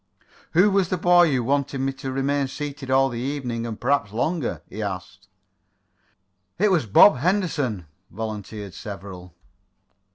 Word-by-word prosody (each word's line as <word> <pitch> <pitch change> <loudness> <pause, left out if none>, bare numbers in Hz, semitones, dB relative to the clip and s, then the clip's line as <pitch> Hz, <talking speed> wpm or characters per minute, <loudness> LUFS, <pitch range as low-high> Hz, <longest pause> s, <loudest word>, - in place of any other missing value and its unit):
"Who 185 +5 +5
was 195 -3 +2
the 185 - 0
boy 175 -1 +5
who 130 -3 +1
wanted 140 +2 0
me 135 +1 -1
to 135 0 -6
remain 135 +1 0
seated 140 -1 -6
all 135 +1 +4
the 120 -3 -5
evening, 125 -3 -3
and 110 -2 -6
perhaps 125 -5 +1
longer?" 140 +6 -2
he 110 - -7
asked. 95 -3 -6 1.3
"It 205 +3 +3
was 160 -10 +1
Bob 125 - +7
Henderson," 150 - -1 0.2
volunteered 105 -2 -6
several. 95 -4 -9
135 Hz, 140 wpm, -23 LUFS, 110-150 Hz, 1.3 s, Bob